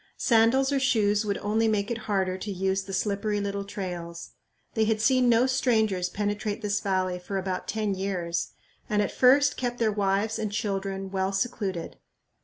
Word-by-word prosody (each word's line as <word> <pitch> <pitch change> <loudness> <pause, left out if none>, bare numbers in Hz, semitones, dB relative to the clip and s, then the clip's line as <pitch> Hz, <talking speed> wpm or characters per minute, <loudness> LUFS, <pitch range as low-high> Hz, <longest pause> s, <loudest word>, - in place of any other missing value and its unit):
Sandals 240 +4 +3
or 280 - +2
shoes 215 -5 +2
would 200 -1 -1
only 220 +2 +1
make 210 0 0
it 235 - -2
harder 190 -2 +1
to 200 +2 -5
use 190 0 0
the 195 0 -9
slippery 205 +2 -1
little 200 0 -2
trails. 175 -4 -6 0.4
They 220 -2 +2
had 215 0 +1
seen 255 +2 +3
no 235 +1 +5
strangers 220 -8 +1
penetrate 205 +2 -2
this 205 0 0
valley 185 -2 -1
for 195 +2 -4
about 185 -1 -3
ten 215 -2 -1
years, 185 -3 -2 0.4
and 210 -1 +2
at - - -2
first 280 +3 +4
kept 245 -1 -2
their 225 -2 +2
wives 200 +2 0
and 215 -2 -2
children 195 -2 -3
well 190 0 0
secluded. 195 -4 -3
205 Hz, 175 wpm, -27 LUFS, 195-225 Hz, 0.4 s, no